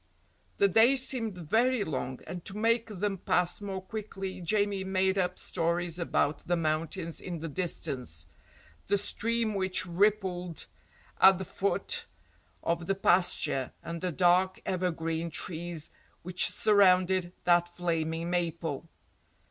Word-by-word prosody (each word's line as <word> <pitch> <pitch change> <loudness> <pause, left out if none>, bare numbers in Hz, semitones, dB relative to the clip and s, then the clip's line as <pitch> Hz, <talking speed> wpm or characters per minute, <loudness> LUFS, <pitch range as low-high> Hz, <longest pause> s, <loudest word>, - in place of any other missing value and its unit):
The 200 - +5
days 240 +7 +5
seemed 225 -7 -2
very 225 +8 +1
long, 130 -5 -4
and 175 +1 -7
to 195 - -5
make 230 +1 +2
them 200 -2 -3
pass 180 +2 0
more 190 -2 -5
quickly 195 -2 -6
Jamie 200 +1 0
made 190 0 +1
up 180 -1 -1
stories 170 0 -2
about 155 -3 -1
the 175 - +2
mountains 165 +1 -2
in 175 -2 -5
the 165 +1 -5
distance, 130 - -2 0.6
the 205 - +2
stream 225 +2 0
which 190 -2 +1
rippled 180 -2 0 0.5
at 190 -1 +7
the 190 - -5
foot 195 +2 -1 0.6
of 170 0 -1
the 195 - +1
pasture 175 -8 +1
and 170 -1 -6
the 180 - -1
dark 180 +2 +3
evergreen 170 -3 -2
trees 165 0 -4 0.3
which 180 +1 +5
surrounded 185 -3 +3
that 175 0 +3
flaming 165 -1 -2
maple. 165 -3 -2
180 Hz, 130 wpm, -29 LUFS, 170-195 Hz, 0.6 s, at